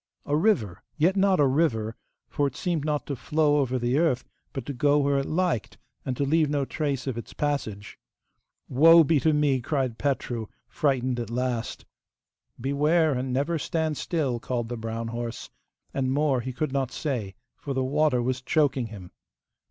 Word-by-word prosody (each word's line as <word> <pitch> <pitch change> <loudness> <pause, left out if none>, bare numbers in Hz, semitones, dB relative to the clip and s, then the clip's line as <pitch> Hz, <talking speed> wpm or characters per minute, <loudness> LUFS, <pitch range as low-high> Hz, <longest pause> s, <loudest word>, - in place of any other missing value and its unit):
A 145 - 0
river, 150 - +1 0.2
yet 170 +5 +3
not 195 -2 +3
a 145 - +5
river, 130 -6 +1 0.3
for 145 -2 0
it 135 - -6
seemed 170 -3 -1
not 150 -1 -1
to 140 - -3
flow 150 +3 +2
over 130 -3 +1
the 125 +3 +1
earth, 155 -7 +2 0.3
but 135 - -5
to 140 - -4
go 145 +3 +3
where 140 -1 +2
it 135 - -3
liked, 170 - -1 0.3
and 130 -2 -3
to - - +1
leave 155 +1 +2
no 145 -2 0
trace 140 -3 -2
of 130 -4 -3
its - - -10
passage. 115 -9 -3 0.7
'Woe 165 +5 +7
be 150 0 +3
to 160 - +3
me!' 145 -3 +2
cried 130 -3 -1
Petru, 120 -5 -1 0.2
frightened 130 -4 0
at 115 -2 -4
last. 120 -1 -2 0.7
'Beware, 150 +5 +2
and 130 0 -2
never 145 +6 0
stand 160 +1 -1
still,' 140 -7 -1
called 120 -1 -3
the 120 - -3
brown 115 0 -4
horse, 115 0 -5 0.4
and 130 -1 0
more 140 -2 +2
he 130 +2 -4
could 135 +3 -2
not 135 -2 -1
say, 120 -10 -3 0.2
for 140 -2 -5
the 130 - +1
water 140 -2 +2
was 130 +1 -1
choking 135 -2 +1
him. 100 -5 -10
135 Hz, 180 wpm, -26 LUFS, 120-150 Hz, 0.7 s, Woe